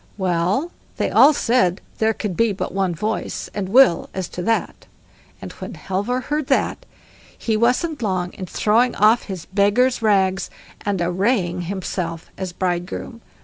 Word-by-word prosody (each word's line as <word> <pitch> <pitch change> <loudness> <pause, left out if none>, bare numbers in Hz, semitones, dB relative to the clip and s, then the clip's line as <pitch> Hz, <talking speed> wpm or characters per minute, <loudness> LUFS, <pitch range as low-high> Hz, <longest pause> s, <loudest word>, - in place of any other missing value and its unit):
Well 190 - 0 0.3
they - - 0
all 290 - +7
said 235 - +2 0.2
there 220 0 +3
could 205 -5 -3
be 230 0 +2
but 190 - -4
one 190 -3 0
voice 215 +7 -3
and 195 -2 -3
will 245 -5 +5
as 190 -2 -3
to 180 - -6
that, 225 +5 -1 0.5
and - - -8
when - - -8
Halvor 205 +7 -2
heard 295 +2 -2
that - - 0 0.5
he 225 - -1
wasn't 250 +7 +1
long 185 -4 -1
in 185 - -7
throwing 230 +7 +2
off 215 +3 +4
his 190 -5 -6
beggar's 210 +6 +2
rags, 195 -3 +2 0.3
and 200 -2 -1
arraying 180 0 0
himself 175 -4 -4
as 190 -2 -5
bridegroom. 180 +6 -3
200 Hz, 150 wpm, -21 LUFS, 185-235 Hz, 0.5 s, all